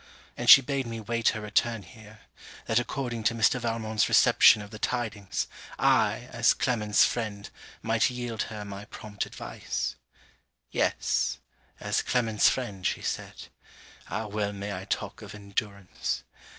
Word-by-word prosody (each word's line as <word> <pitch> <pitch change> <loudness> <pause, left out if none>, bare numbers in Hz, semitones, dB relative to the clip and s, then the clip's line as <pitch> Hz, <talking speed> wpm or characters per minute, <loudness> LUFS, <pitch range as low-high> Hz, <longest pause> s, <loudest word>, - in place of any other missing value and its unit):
And - - -1
she 135 - +12
bade 135 -1 -2
me 115 -1 -5
wait 115 +1 -1
her 110 - -3
return 105 +1 0
here, 110 +3 -15 0.4
that 115 +1 +2
according 120 -1 -3
to 115 - +2
Mr. 115 +3 +3
Valmont's 115 -2 0
reception 105 - +6
of 105 - -12
the 110 - -9
tidings, 110 -5 -2 0.3
I, - - +2
as - - +3
Clement's 105 -4 +3
friend, 105 -4 -3 0.4
might 115 +2 +2
yield 120 -2 -4
her 105 -2 -6
my 100 0 -8
prompt 105 -1 -6
advice. - - -4 0.8
Yes! - - 0 0.4
as - - 0
Clement's 115 -4 +2
friend, 105 -8 -4
she - - -1
said. - - -5 0.6
Ah 110 - -3
well 105 -1 -2
may 100 +1 -5
I 95 +1 -7
talk - - -3
of - - -9
endurance! 100 -1 -4
110 Hz, 145 wpm, -28 LUFS, 105-115 Hz, 0.8 s, she